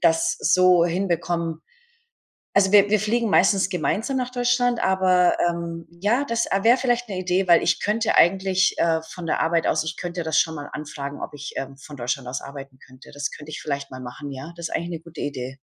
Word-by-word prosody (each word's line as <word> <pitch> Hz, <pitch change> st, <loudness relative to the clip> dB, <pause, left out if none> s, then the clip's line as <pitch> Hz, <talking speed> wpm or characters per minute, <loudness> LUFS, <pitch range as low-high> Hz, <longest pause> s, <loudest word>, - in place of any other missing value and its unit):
das 165 Hz, 0 st, +2 dB
so 185 Hz, -1 st, +4 dB
hinbekommen. 170 Hz, -2 st, -1 dB, 1.0 s
Also, 195 Hz, -1 st, +4 dB
wir 205 Hz, -1 st, +6 dB
wir 215 Hz, 0 st, +3 dB
fliegen 225 Hz, +2 st, 0 dB
meistens 195 Hz, -1 st, +3 dB
gemeinsam 205 Hz, -, -1 dB
nach 250 Hz, -1 st, -2 dB
Deutschland 245 Hz, -1 st, +1 dB
aber, 185 Hz, -1 st, +3 dB
ähm, 170 Hz, -1 st, -4 dB, 0.2 s
ja 235 Hz, +8 st, +2 dB
das 230 Hz, -3 st, 0 dB, 0.2 s
wäre 235 Hz, +3 st, +6 dB
vielleicht 245 Hz, -2 st, 0 dB
'ne 195 Hz, -3 st, -4 dB
Idee, 185 Hz, +1 st, 0 dB
weil 170 Hz, -1 st, +6 dB
ich 175 Hz, -, +1 dB
könnte 220 Hz, +2 st, +1 dB
eigentlich, 190 Hz, +1 st, +3 dB
äh, 165 Hz, -1 st, +2 dB
von 170 Hz, +1 st, -9 dB
der -, -, 0 dB
Arbeit 165 Hz, 0 st, +1 dB
aus -, -, +1 dB
ich 160 Hz, +1 st, -4 dB
könnte 175 Hz, -1 st, -4 dB
das 160 Hz, -1 st, +2 dB
schon 160 Hz, -1 st, 0 dB
mal 145 Hz, -1 st, -7 dB
anfragen 145 Hz, -2 st, -6 dB
ob -, -, -6 dB
ich, 145 Hz, 0 st, -7 dB
ähm, 135 Hz, 0 st, -5 dB
von 145 Hz, +1 st, -11 dB
Deutschland 125 Hz, +1 st, -3 dB
aus 125 Hz, +1 st, -4 dB
arbeiten 140 Hz, -1 st, -10 dB
könnte, 130 Hz, +1 st, -16 dB
das 145 Hz, +1 st, -3 dB
könnte 150 Hz, +1 st, -10 dB
ich 155 Hz, -, -6 dB
vielleicht 140 Hz, -2 st, -4 dB
mal 130 Hz, 0 st, -8 dB
machen 130 Hz, +3 st, -8 dB
ja, 140 Hz, +5 st, -8 dB
das 170 Hz, -1 st, -5 dB
ist -, -, -3 dB
eigentlich 170 Hz, -, -3 dB
eine 170 Hz, -2 st, -5 dB
gute 165 Hz, -1 st, -10 dB
Idee. 130 Hz, -2 st, -5 dB
170 Hz, 210 wpm, -23 LUFS, 150-195 Hz, 1.0 s, wir